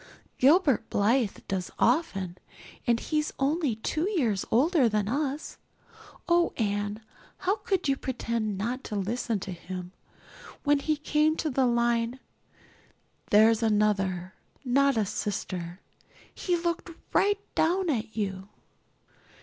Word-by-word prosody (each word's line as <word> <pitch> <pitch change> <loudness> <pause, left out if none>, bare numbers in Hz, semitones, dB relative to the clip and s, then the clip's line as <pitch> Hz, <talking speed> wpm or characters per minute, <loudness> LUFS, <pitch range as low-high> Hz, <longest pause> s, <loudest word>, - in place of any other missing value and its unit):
Gilbert 275 - +4
Blythe 225 +1 +2
does 185 -2 -2
often 200 - +1 0.5
and 235 -1 +3
he's 305 +3 -1
only 285 -2 +1
two 310 - -1
years 240 - +1
older 275 +1 +4
than 210 -2 0
us. 285 +4 -2 0.7
Oh, 345 0 +3
Anne, 205 0 -1 0.4
how 390 +4 0
could 385 -8 -1
you 275 - +3
pretend 235 -6 -2
not 240 +6 -3
to 210 - -5
listen 220 +2 -1
to 190 - -5
him? 180 +1 -7 0.7
When 290 -1 +3
he 305 +2 0
came 305 +1 +2
to 310 - -1
the 260 0 +2
line, 235 +1 +1 1.1
'There's 220 +2 +5
Another, 200 -4 +1 0.3
not 275 +1 +3
a 215 - +2
sister,' 185 -3 -4 0.5
he 355 -2 0
looked 340 +1 -2 0.2
right 405 0 +3
down 355 +1 +2
at 225 -3 -3
you." 195 -2 -3
235 Hz, 125 wpm, -28 LUFS, 205-300 Hz, 1.1 s, There's